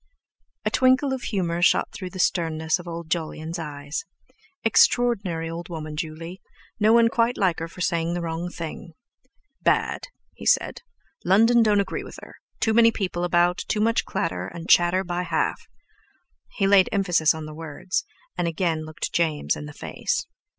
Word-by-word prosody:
A - - +1
twinkle 260 +1 +3
of 260 - -3
humour 175 -6 -2
shot - - +3
through 185 -2 -6
the 185 - -10
sternness 160 -2 +1
of 175 - -10
old 170 -1 -7
Jolyon's 160 0 -3
eyes. 145 -1 -5 0.6
Extraordinary 205 -7 +3
old 170 +2 -6
woman, 155 -2 -6
Juley! 165 +3 -6 0.4
No 215 +1 +4
one 230 0 +6
quite 230 +1 +1
like 185 -4 +1
her 165 - -4
for 180 +2 -11
saying 170 -2 0
the 175 - -2
wrong 165 +1 -3
thing! 165 0 -7 0.7
"Bad!" - - +1 0.3
he - - -8
said; - - +2 0.4
"London 225 +6 +5
don't 210 -2 +4
agree 200 - -4
with - - -10
her—too 220 - -4
many 230 0 +6
people 185 -5 -3
about, 175 0 +2
too 215 - 0
much 225 +2 +2
clatter 90 0 -3
and 165 - -8
chatter 175 +2 +4
by 175 -1 -2
half." 180 - -1 0.9
He 195 - +2
laid 195 -1 +5
emphasis 175 -6 +2
on 160 -1 -6
the 155 - -8
words, 160 +3 -3 0.3
and 175 -1 -1
again 165 -1 -1
looked 155 - -5
James 160 -3 +1
in 150 - -7
the - - -8
face. - - -3
175 Hz, 165 wpm, -24 LUFS, 160-200 Hz, 0.9 s, one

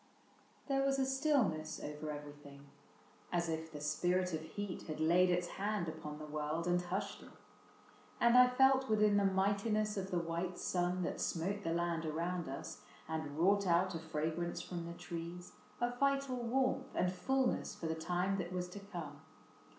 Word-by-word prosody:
There 270 -1 +2
was 275 0 +2
a 265 - +2
stillness 265 - +1
over 150 +1 -5
everything, 145 -1 -8 0.7
As 175 -1 +1
if 160 0 -3
the 150 - -7
spirit 175 +5 +1
of 160 - -1
heat 180 +4 -5
had 155 -1 -4
laid 175 +3 +5
its 175 0 +2 0.2
hand 205 -4 0
Upon 155 -1 -6
the 155 - -7
world 150 +2 -2
and 175 0 +2
hushed 195 +3 -3
it; - - -12 0.9
and 235 0 +5
I 250 0 +9
felt 265 +1 +4
Within 210 -1 +4
the 200 - +3
mightiness 205 +2 +1
of 190 0 -2
the 180 - 0
white 170 +2 -2
sun 180 0 0
That - - -2
smote 190 +5 -1
the 165 - -2
land 170 -1 0
around 170 +2 -2
us 135 - -6 0.3
and 155 -2 -4
wrought 200 +4 +4
out 180 +2 +3
A 165 - -3
fragrance 160 +2 -2
from 170 -2 -5
the 170 - -5
trees, 170 +1 -6 0.3
a 240 0 0
vital 275 0 +1
warmth 260 +2 0
And 180 0 +1
fullness 265 +6 0
for - - -7
the 160 - 0
time 180 +4 0
that 175 -1 -3
was 180 -1 -2
to 200 - -8
come. 170 -8 -7
180 Hz, 175 wpm, -36 LUFS, 160-205 Hz, 0.9 s, I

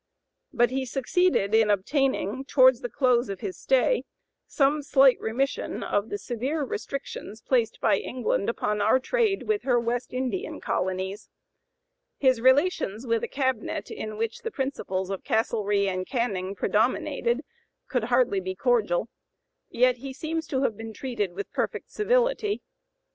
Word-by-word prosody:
But 240 +1 +2
he 265 0 -1
succeeded 265 - +1
in 220 -1 +5
obtaining, 260 +2 0
towards 260 -2 +5
the 245 - -4
close 245 -2 +2
of 195 -2 -5
his 370 - -4
stay, - - +2 0.4
some 290 +1 +2
slight 270 -2 +5
remission 265 +5 -2
of 205 +2 -1
the 205 - -2
severe 260 +8 -2
restrictions 245 -3 -5
placed 235 -1 0
by - - +3
England 245 -4 -1
upon 210 -2 -1
our 220 +5 +4
trade 435 - +1
with 430 -1 0
her 245 -3 +2
West 235 +1 -2
Indian 260 - -3
colonies. 190 +2 -3 0.9
His 260 -4 +3
relations 260 - +2
with 230 -2 0
a - - -1
cabinet 260 -4 -2
in 215 -1 -6
which 225 0 -2
the 455 - -3
principles 195 - -3
of 195 - -4
Castlereagh 210 -3 +1
and 185 0 -3
Canning 200 -6 -2
predominated 240 - 0 0.4
could 250 -4 -1
hardly 245 -4 +2
be 185 0 -4
cordial, 225 -5 +1 0.6
yet 250 +1 +3
he 265 +2 -7
seems 320 +3 -3
to 265 -1 -1
have 230 - +1
been 225 +1 -8
treated 215 -6 -3
with 200 +2 -6
perfect - - -3
civility. 470 -1 +1
245 Hz, 150 wpm, -26 LUFS, 210-275 Hz, 0.9 s, in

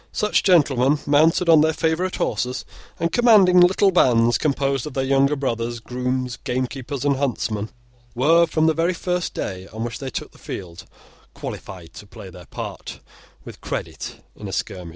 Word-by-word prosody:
Such 210 0 +1
gentlemen, 145 -6 +3
mounted 160 +4 +3
on 160 -2 +7
their 160 +1 +2
favourite 165 +4 -1
horses, 125 +1 -2 0.3
and 170 0 0
commanding 210 -6 +5
little 190 +2 +4
bands 120 - +3
composed 140 -2 0
of 150 - -9
their 135 - 0
younger 135 +2 +2
brothers, 120 -4 -3
grooms, 125 +1 -3
gamekeepers, 130 +2 -4
and 140 -2 +2
huntsmen, 115 -6 -2 0.5
were, 165 +7 +4
from 160 -1 +1
the 160 - +3
very 170 +3 0
first 180 0 -3
day 95 -1 -5
on 110 +1 -6
which 120 0 -5
they 135 - -5
took - - -6
the - - -20
field, 85 -3 -8 0.5
qualified 85 -3 -8
to 105 - -12
play 95 -1 -11
their 90 -1 -13
part - - -7 0.5
with - - -11
credit - - -5 0.2
in - - -8
a - - -6
skirmish. 90 -3 -4
135 Hz, 170 wpm, -22 LUFS, 120-165 Hz, 0.5 s, on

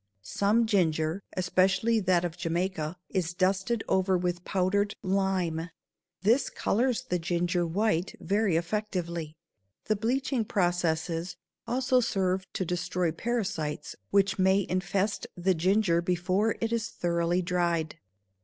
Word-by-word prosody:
Some 205 - +2
ginger, 165 -4 +1 0.2
especially 190 +5 +2
that 180 -3 +2
of 165 -2 -4
Jamaica, 175 -1 -2
is 175 -3 -1
dusted 190 +4 +1
over 190 0 +2
with 175 0 -2
powdered 200 +2 0
lime; 185 -4 0 0.5
this 230 +7 +3
colors 250 +2 0
the 205 -9 -1
ginger 175 +1 0
white 190 0 0
very 200 -3 +1
effectively. 170 -3 -2 0.5
The 215 - +1
bleaching 250 +3 0
processes 175 -3 -1 0.3
also 255 +2 +2
serve 190 -5 0
to 185 - -2
destroy 180 0 -1
parasites 190 -7 -3
which 195 -1 +2
may 190 +1 +3
infest 195 +2 -1
the 185 +2 +2
ginger 180 0 +2
before 185 +5 +1
it 225 0 -1
is 225 -1 -1
thoroughly 170 0 0
dried. 170 -3 -1
185 Hz, 120 wpm, -28 LUFS, 170-205 Hz, 0.5 s, this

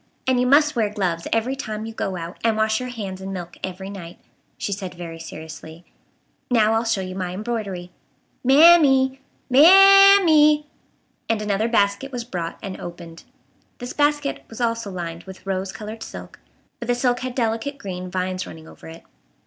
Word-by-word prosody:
And 260 -1 +2
you 250 - +1
must 295 +2 +4
wear 220 -3 +1
gloves 180 -5 -2
every 230 +4 0
time 215 -5 -5
you 225 - -7
go 190 -4 -3
out, 170 +1 -7
and 225 -1 +1
wash 220 0 +1
your 250 0 -5
hands 195 -6 -6
in 190 0 -6
milk 175 -2 -7
every 190 +1 -5
night," 175 -4 -9 0.4
she - - -4
said 190 -2 -5
very 165 -2 -8
seriously. 160 +1 -10 0.6
"Now 220 -3 +3
I'll 225 +1 0
show 225 -4 0
you 185 0 -6
my 185 -1 -4
embroidery. 200 -5 -5 0.5
Mam 315 +7 +7
m 310 - +4
e 265 -1 +4
e! 265 - -23 0.3
Mam 390 +7 +8
m 365 - 0
e 305 -1 +6
e," 300 0 -5 0.6
and 225 -2 +1
another 210 +1 -1
basket 215 +3 0
was 245 -2 -4
brought 175 -8 -5
and 195 -2 -7
opened. 170 -1 -10 0.5
This 245 0 -7
basket 290 -1 0
was 225 - -10
also 230 -3 -1
lined 170 -2 -6
with 190 0 -12
rose 190 0 -3
colored 215 +2 -8
silk, - - -10 0.4
but 235 - -7
the 245 - +1
silk 245 0 0
had 255 -1 -5
delicate 235 +4 -2
green 185 -5 -6
vines 185 0 -3
running 160 0 -11
over - - -14
it. 165 +1 -11
215 Hz, 190 wpm, -22 LUFS, 185-250 Hz, 0.6 s, Mam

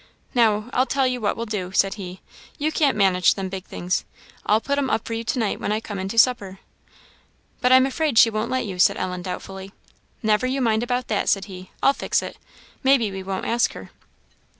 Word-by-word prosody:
"Now, 220 -3 +2
I'll 255 +2 +2
tell 270 -1 +1
you 250 -1 -1
what 205 - 0
we'll 230 - -3
do," 200 -5 -4
said 195 0 +3
he; 185 -2 -8 0.4
"you 305 +2 0
can't 290 -6 +2
manage 185 -3 +4
them 195 -1 -4
big 190 -1 -6
things; 180 +1 -2 0.4
I'll 210 +1 +4
put 280 +4 -1
'em 270 -2 -1
up 220 - -1
for 230 - -4
you 225 0 -3
to 235 - -1
night 225 -4 -1
when - - -2
I 215 - +1
come 205 -3 -6
in 190 - -3
to 225 +4 -6
supper." 215 -6 +3 1.0
"But 250 - +3
I'm 260 0 +7
afraid 280 -1 -1
she 225 - +7
won't 215 +1 -2
let 260 -1 -1
you," 190 -3 -6
said - - +4
Ellen, 180 -1 -3
doubtfully. 190 +1 -7 0.5
"Never 215 +3 +2
you 265 +2 -1
mind 225 -3 +2
about 245 +1 -2
that," 210 - 0
said 195 -1 +1
he, 185 -2 -10
"I'll 275 - +5
fix - - -1
it. - - -8 0.4
Maybe 265 -6 +3
we 190 0 -6
won't 190 0 -4
ask 235 +1 +1
her." - - -11
220 Hz, 220 wpm, -23 LUFS, 195-250 Hz, 1.0 s, I'm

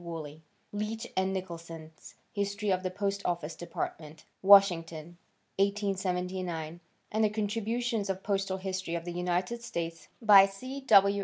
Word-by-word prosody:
Wooley; 160 -3 -7 0.3
Leech 215 +2 -3
and 190 0 +1
Nicholson's 165 -4 -7 0.2
History 200 0 -1
of 185 0 +1
the 185 - -2
Post 200 +1 -2
Office 170 -2 -2
Department, 155 -2 -6 0.2
Washington, 175 -4 +5 0.4
1879, 185 -4 -1 0.3
and 220 +1 +1
the 215 - +4
contributions 220 +1 -1
of 190 - 0
the 190 - -24
Postal 195 -2 -1
History 190 -2 -3
of 170 0 -4
the 175 - -4
United 180 +6 -1
States 170 -8 -5
by 205 -4 +8
C. 255 +8 -7
W. 200 -1 +6
190 Hz, 140 wpm, -30 LUFS, 170-205 Hz, 0.4 s, by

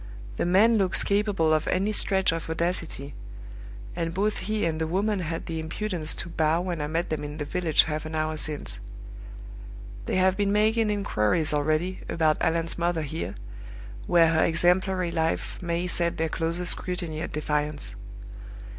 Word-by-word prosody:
The - - 0
man 215 +5 +5
looks 190 -2 +3
capable 200 -6 +2
of 155 -1 +1
any 195 +3 +1
stretch 190 -3 +3
of 165 -1 -4
audacity; 160 -4 -2 0.8
and 165 -1 -3
both 210 +2 0
he 215 -2 -1
and 160 -1 -1
the 160 - 0
woman 200 +4 0
had 165 -2 -4
the 160 -1 -4
impudence 165 0 -2
to 175 - -6
bow 160 0 +1
when 175 -3 -3
I 150 - -2
met 165 +3 -2
them 155 - -2
in 150 +1 -6
the 145 - -3
village 165 0 +3
half 155 -1 -3
an 160 - -6
hour 155 0 -1
since. 155 -1 -1 1.3
They - - 0
have 185 0 +3
been 200 0 +1
making 215 +1 +2
inquiries 160 - +1
already 155 +5 0
about 155 -2 +1
Allan's 165 +1 0
mother 170 -2 0
here, 150 - -4 0.7
where 170 -2 +5
her 160 - +3
exemplary 180 +2 +2
life 165 -1 -2
may 170 0 -1
set 170 -1 0
their 160 0 0
closest 170 +2 -1
scrutiny 175 -4 -3
at - - -4
defiance. 150 -1 -2
170 Hz, 165 wpm, -26 LUFS, 155-185 Hz, 1.3 s, man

